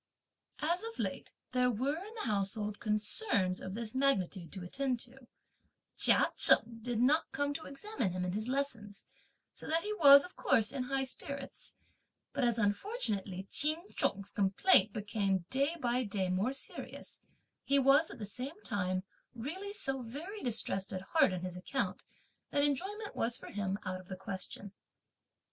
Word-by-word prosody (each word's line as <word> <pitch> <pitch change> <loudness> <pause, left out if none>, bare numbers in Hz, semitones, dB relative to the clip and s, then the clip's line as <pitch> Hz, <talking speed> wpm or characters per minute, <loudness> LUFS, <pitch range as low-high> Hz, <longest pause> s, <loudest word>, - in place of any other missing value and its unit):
As 340 +4 +1
of 455 0 -7
late - - -4 0.2
there 250 -1 +3
were 260 +6 0
in 430 +3 -11
the 440 - -4
household 210 0 -1
concerns 210 - +1
of 190 +1 -6
this 225 -1 -4
magnitude 195 - 0
to 190 -3 -6
attend 255 +6 -1
to, 255 0 -8 0.7
Chia - - +5
Cheng 230 0 +6
did 240 -1 -2
not 280 +6 +3
come 285 +1 -1
to 315 - -6
examine 280 - -3
him 180 0 -2
in 180 - -1
his 215 +4 -3
lessons, 245 -7 -2 0.5
so - - -8
that 325 +1 +1
he 425 - -2
was, 280 -7 +9
of 360 - -10
course, 220 -1 +2
in 265 -2 -3
high 270 +1 0
spirits, 275 +1 -6 0.6
but, 275 - -1
as 240 -2 +3
unfortunately 205 - -2
Ch'in 315 +6 0
Chung's 195 0 0
complaint 200 - +4
became, 200 -4 -1
day 280 +5 +1
by 250 -1 +1
day, 200 -4 -2
more 190 +7 +1
serious, 275 - -6 0.4
he 280 - +2
was 275 +4 +5
at - - -8
the 215 - -5
same 255 - -5
time 185 -3 -1 0.3
really 340 - -5
so 270 -10 -2
very 305 - -7
distressed 215 -5 -1
at 185 -1 -4
heart 310 - +3
on 180 -1 -3
his 180 -1 -4
account, 265 +9 -2 0.5
that 285 - +2
enjoyment 390 +10 -2
was 235 +1 -1
for - - -10
him 200 -1 -2
out 185 0 -3
of 185 - -14
the 185 - -6
question. 190 +1 -6
245 Hz, 165 wpm, -33 LUFS, 200-285 Hz, 0.7 s, was